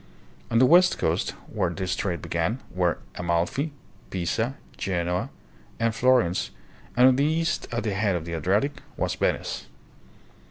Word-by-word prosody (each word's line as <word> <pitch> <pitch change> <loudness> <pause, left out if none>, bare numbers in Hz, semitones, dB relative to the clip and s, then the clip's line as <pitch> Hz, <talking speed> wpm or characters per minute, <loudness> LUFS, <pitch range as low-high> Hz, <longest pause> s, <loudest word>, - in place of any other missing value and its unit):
On 115 - +2
the 130 - +7
west 180 +6 +6
coast, 80 +1 0
where 95 -5 -1
this 90 +1 -2
trade 90 -4 -2
began, 85 +9 -1
were 90 -2 +1 0.2
Amalfi, 85 - 0 0.4
Pisa, 110 +8 -1 0.2
Genoa, 90 -1 -1 0.5
and 115 0 +2
Florence, 120 -7 +3 0.5
and 125 +1 +8
on 130 - +3
the 140 - +3
east, 165 +2 0
at 120 -1 -1
the 105 -3 -1
head 100 -1 +1
of 85 -2 -3
the 85 - -5
Adriatic, 105 - 0 0.2
was - - 0
Venice. - - -1
100 Hz, 150 wpm, -26 LUFS, 85-130 Hz, 0.5 s, and